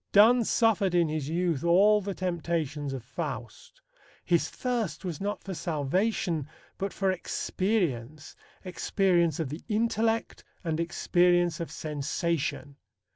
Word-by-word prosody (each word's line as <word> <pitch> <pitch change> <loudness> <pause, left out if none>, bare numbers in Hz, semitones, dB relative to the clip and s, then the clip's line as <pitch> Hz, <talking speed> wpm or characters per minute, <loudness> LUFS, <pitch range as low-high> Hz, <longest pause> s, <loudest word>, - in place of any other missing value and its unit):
Donne 230 +4 +6
suffered 215 -5 +2
in 170 -2 +3
his 155 -2 -3
youth 170 -3 0
all 200 +5 +5
the 200 -1 -4
temptations 165 -5 -2
of 135 -3 -5
Faust. 125 -5 -6 0.5
His 170 -2 +2
thirst 225 - -3
was 170 -3 -4
not 205 +1 -3
for 195 - -5
salvation 165 +1 -1 0.3
but 195 0 -2
for 195 -1 0
experience 165 - -2 0.3
experience 180 -3 +1
of 155 -5 -2
the 155 +5 -6
intellect 225 +1 0 0.2
and 160 -2 -1
experience 175 0 +2
of 170 - -4
sensation. 150 -1 -3
175 Hz, 125 wpm, -28 LUFS, 155-195 Hz, 0.5 s, Donne